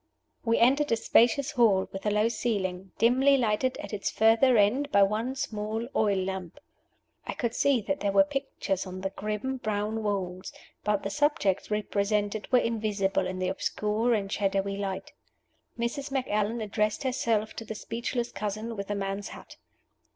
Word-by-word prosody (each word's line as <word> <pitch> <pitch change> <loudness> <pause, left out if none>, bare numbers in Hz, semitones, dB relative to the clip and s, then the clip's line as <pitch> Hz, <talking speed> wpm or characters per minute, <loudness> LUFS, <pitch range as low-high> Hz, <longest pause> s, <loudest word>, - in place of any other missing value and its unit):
We 230 -1 +2
entered 275 +4 +3
a - - +5
spacious 240 +4 +3
hall 210 -6 +3
with 195 +2 -5
a - - +4
low 210 +2 +2
ceiling, 190 -6 -2
dimly 260 +5 +4
lighted 245 +2 +1
at - - -8
its 200 - -1
further 225 +3 +4
end 250 +8 +2
by 200 - +6
one 220 +6 0
small 220 -2 -3
oil 205 -2 +2
lamp. 190 - -4 0.7
I - - -2
could 235 -2 -2
see 275 -4 +2
that 285 +7 -2
there 200 - 0
were 290 - +6
pictures 275 -9 -3
on 185 0 -7
the 195 0 -2
grim, 215 +7 -3
brown 215 -1 -2
walls, 190 -3 -3 0.3
but 210 -1 0
the 200 - -3
subjects 205 -6 +1
represented 210 0 -1
were 255 - +6
invisible 210 -5 0
in 185 0 -4
the 185 0 -1
obscure 220 +5 0
and 200 -2 -3
shadowy 195 -1 0
light. 195 -1 -4 0.6
Mrs. 245 +5 -2
Macallan 230 -4 -1
addressed 210 +2 -1
herself 230 -5 0
to - - -4
the 220 0 -6
speechless 235 +2 -3
cousin 215 +2 -4
with 200 -1 -5
the 205 - -2
man's 195 0 -3
hat. - - -11
215 Hz, 165 wpm, -28 LUFS, 200-235 Hz, 0.7 s, by